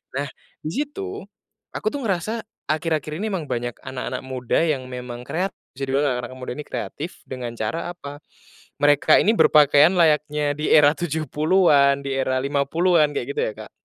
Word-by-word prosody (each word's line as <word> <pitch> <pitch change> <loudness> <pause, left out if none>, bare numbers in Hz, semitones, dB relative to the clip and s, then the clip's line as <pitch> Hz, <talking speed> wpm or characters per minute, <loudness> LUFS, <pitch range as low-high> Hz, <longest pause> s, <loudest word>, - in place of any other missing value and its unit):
nah 140 +1 -1 0.3
disitu, 295 - -4 0.5
aku - - -5
tuh 280 +5 -2
ngerasa 215 +2 -2 0.2
akhir-akhir 155 -1 -1
ini 215 +5 -3
memang 170 -7 -3
banyak 120 0 -3
anak-anak 130 -1 -5
muda 125 -2 -1
yang 135 -6 -1
memang 125 -1 -7
kreatif 180 +9 -3 0.2
bisa 135 +2 -7
dibilang 135 -2 +1
anak-anak 125 +1 -7
muda 130 0 -6
ini 150 - -6
kreatif 160 +5 -6
dengan 120 -2 -6
cara 165 +11 -3
apa, 145 -3 -9 0.6
mereka 145 +1 +5
ini 215 - +4
berpakaian 150 +3 +6
layaknya 150 -3 +2
di 150 +1 -3
era 145 -1 +6
70-an 155 -2 +2
di 140 - -4
era 130 -1 0
50-an 150 +3 +2
kayak - - -2
gitu 435 - -4
ya - - 0
Kak, - - -11
150 Hz, 160 wpm, -23 LUFS, 135-175 Hz, 0.6 s, berpakaian